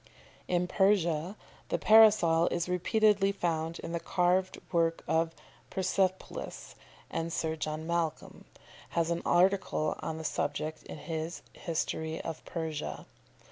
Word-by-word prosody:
] - - -28
In 175 - +1
Persia 180 -1 +2 0.3
the - - +1
Parasol 210 -7 +6
is 170 0 -1
repeatedly 200 +2 +3
found 165 -3 -2
in - - -6
the 170 - -1
carved 180 +2 +1
work 165 -2 +1
of 165 0 +1 0.3
Persepolis, 190 0 -2 0.4
and 165 0 -2
Sir 160 -1 -1
John 155 0 -4
Malcolm 170 -2 -2 0.5
has 165 0 +2
an 170 - -1
article 180 -4 +2
on 160 - -4
the 160 - -6
subject 155 +1 -2
in - - -8
his 160 +2 -5
"History 160 -1 -3
of 160 - -6
Persia." 160 -3 -4
170 Hz, 130 wpm, -30 LUFS, 160-185 Hz, 0.5 s, Parasol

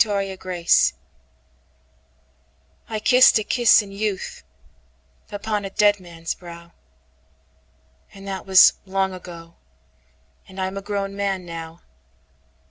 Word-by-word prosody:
Scintilla 190 -4 -2 2.3
I 220 -1 -3
KISSED 250 +3 +6
a - - -3
kiss 240 0 +4
in 200 - -12
youthUpon 70 - -7
a 195 - -5
dead 205 +1 +2
man's 165 -2 -6
brow; 170 -1 -13 1.4
And 195 0 -13
that 195 0 -6
was 190 0 +7
long 190 0 -1
ago,—And 65 - -16
I'm 190 +1 -3
a - - -4
grown 200 -1 -4
man 195 -2 -2
now. 165 0 -9
185 Hz, 100 wpm, -22 LUFS, 160-200 Hz, 2.3 s, was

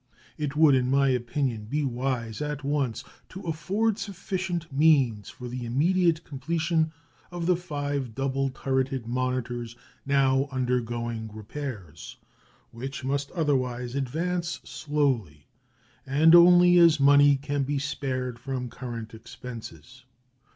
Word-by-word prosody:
It 150 -2 -3
would, 155 -2 +6
in 130 -1 +2
my 135 0 +3
opinion, 125 -2 -1
be 145 +7 -1
wise 120 -3 -2
at 150 -1 -3
once 140 -4 -1 0.3
to 190 - -9
afford 195 +7 -1
sufficient 180 -5 -4
means 135 -8 +3
for 125 - -9
the 125 +1 -5
immediate 165 +7 +2
completion 160 +3 -1 0.4
of 175 -1 -5
the 180 +1 +4
five 145 -7 -4
double 135 0 0
turreted 130 -1 -2
monitors 120 -1 -2 0.3
now 135 0 +2
undergoing 120 -3 -2
repairs, 110 - -8 0.5
which 130 +3 -6
must 140 +1 -1
otherwise 130 -7 -1
advance 170 +6 -2
slowly, 130 - -1 0.6
and 150 +5 +4
only 175 0 +8
as 165 -3 +6
money 145 0 +6
can 145 +1 -2
be 140 +1 -1
spared 130 -3 -3
from 125 0 -4
current 115 -3 -7
expenses. 115 - -10
135 Hz, 120 wpm, -26 LUFS, 125-155 Hz, 0.6 s, only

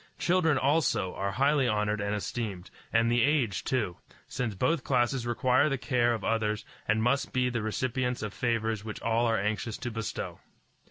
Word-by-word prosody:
Children 170 -5 +2
also 140 - +1
are 100 +1 -2
highly 140 +2 +3
honored 105 -1 0
and 100 +1 -1
esteemed, 105 -3 -4 0.2
and 115 +1 +3
the 120 0 +3
aged 135 -7 +1
too, 115 - 0 0.3
since 115 -5 -3
both 130 - +1
classes 120 -1 +1
require 125 +4 +3
the 135 - 0
care 120 -2 +1
of 110 - -7
others 110 -1 0 0.2
and 110 +1 +2
must 140 +3 +1
be 125 -1 +1
the 120 -2 -2
recipients 125 +2 -1
of 105 -2 -4
favors 115 -3 -1
which 110 -1 -6
all 115 +1 +2
are 115 -1 +2
anxious 105 +3 -2
to 120 - -4
bestow. 115 -1 -4
120 Hz, 175 wpm, -29 LUFS, 110-130 Hz, 0.3 s, highly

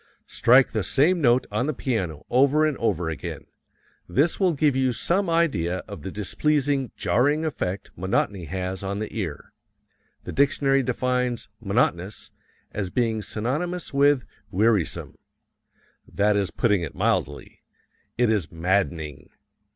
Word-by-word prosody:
Strike 125 +2 +4
the 110 - -1
same 150 - +2
note 125 -2 +4
on 125 - 0
the 155 - -1
piano 95 - -2
over 140 +5 +4
and 155 -2 0
over 90 -7 0
again. 80 -2 -5 0.6
This 155 +5 +1
will 185 -3 +3
give 145 -2 +2
you 130 -1 +1
some 180 - 0
idea 100 - +1
of 100 - -8
the 95 - -5
displeasing, 140 +6 0
jarring 145 +6 +2
effect 100 -10 -3
monotony 95 0 -1
has 95 +3 -4
on 100 0 -3
the 110 +2 -5
ear. 90 -9 -5 0.7
The - - -6
dictionary 135 0 +2
defines 125 -2 -1
"monotonous" 100 -3 -1 0.4
as 100 -3 -3
being 110 +1 0
synonymous 150 - -3
with 140 -1 +3 0.2
"wearisome." 105 -2 0 0.9
That 105 +1 +1
is 100 -2 +1
putting 105 -6 +1
it 80 - -5
mildly. - - -1 0.6
It 120 -2 +3
is 100 -7 -1
maddening. 80 -4 -1
115 Hz, 135 wpm, -24 LUFS, 95-140 Hz, 0.9 s, Strike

